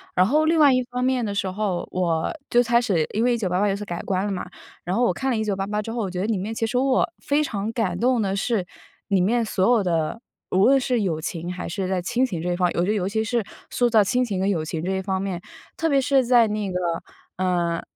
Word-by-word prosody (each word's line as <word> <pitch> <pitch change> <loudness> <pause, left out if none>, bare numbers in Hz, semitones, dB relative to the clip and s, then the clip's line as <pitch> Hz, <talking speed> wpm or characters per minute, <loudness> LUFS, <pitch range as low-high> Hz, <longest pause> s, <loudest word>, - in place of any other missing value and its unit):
然 180 - +5
后， 300 +9 +3
另 325 +1 +3
外 290 -2 +7
一 255 0 +2
方 250 0 -2
面 255 -2 +1
的 205 - -3
时 200 -1 -1
候， 190 -2 -2
我 170 -3 0 0.2
就 240 - +5
开 235 0 +3
始， 175 -9 +1
因 220 - +1
为 245 0 +3
1988 200 -3 0
有 195 - +1
所 205 - -6
改 175 -3 -4
观 190 0 -1
了 205 - -2
嘛。 190 - -4 0.4
然 180 +2 -2
后 245 - +2
我 210 - +2
看 265 +9 -2
了 235 - 0
1988 210 -1 -1
之 225 - -6
后， 235 0 -2
我 200 - -2
觉 180 - -4
得 200 - -1
里 225 -3 0
面 205 +4 -4
其 225 - -1
实 235 - -1
我 260 0 +2
非 295 +1 +1
常 210 -5 -3
感 195 -7 -1
动 245 0 +2
的 195 -2 0
是 200 -1 0 0.4
里 195 -2 +2
面 230 +6 +2
所 195 -3 0
有 210 - +1
的， 170 +4 -1 0.3
无 190 +2 +4
论 270 +2 +5
是 250 -3 0
友 170 -6 -1
情 170 +2 -4
还 180 - -5
是 190 +2 -3
在 190 -1 0
亲 240 +7 0
情 185 -10 -4
这 180 +1 -1
一 - - 0
方， 180 0 +2
我 - - +1
觉 - - -1
得 - - +2
尤 195 -3 -1
其 220 +2 0
是 235 0 0 0.3
塑 245 -1 +2
造 220 -2 +5
亲 250 +6 +1
情 205 -6 -2
和 190 - 0
友 190 -6 0
情 160 0 -4
这 185 - -1
一 190 0 -1
方 190 0 -2
面， 190 -2 -3 0.3
特 325 - 0
别 280 -2 +4
是 270 0 +3
在 240 -2 +5
那 210 -2 -2
个， 180 - -1 0.6
呃 175 -2 0
205 Hz, 285 characters per minute, -23 LUFS, 185-240 Hz, 0.6 s, 外